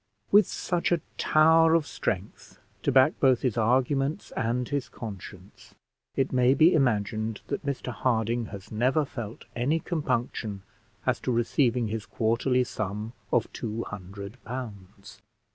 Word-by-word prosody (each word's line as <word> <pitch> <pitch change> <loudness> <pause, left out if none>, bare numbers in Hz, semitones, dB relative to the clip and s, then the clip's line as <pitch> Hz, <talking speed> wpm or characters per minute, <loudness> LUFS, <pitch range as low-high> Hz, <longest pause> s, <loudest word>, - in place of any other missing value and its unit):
With 205 -1 +7
such 175 -1 -1
a 170 -3 +2 0.2
tower 160 +1 +5
of 165 -3 +2
strength 95 -6 -4 0.2
to - - +1
back 135 +4 +4
both 130 -3 +4
his 125 -5 +1
arguments 135 - +1
and 120 +2 -1
his 140 -2 -2
conscience, 100 -3 -10 0.4
it 135 0 0
may 125 +1 +4
be 165 +5 +6
imagined 110 - 0
that 140 - -3
Mr 140 -3 -3
Harding 115 -1 0
has 100 -2 -10
never 130 +7 +2
felt 115 -4 -7
any 135 +7 +1
compunction 120 - -2 0.4
as 130 -1 +1
to 130 - -2
receiving 120 0 +1
his 110 -1 -4
quarterly 125 +3 +1
sum 105 0 -4 0.2
of - - +1
two 115 0 -4
hundred 100 0 -9
pounds. 100 -5 -8
120 Hz, 140 wpm, -27 LUFS, 110-135 Hz, 0.4 s, With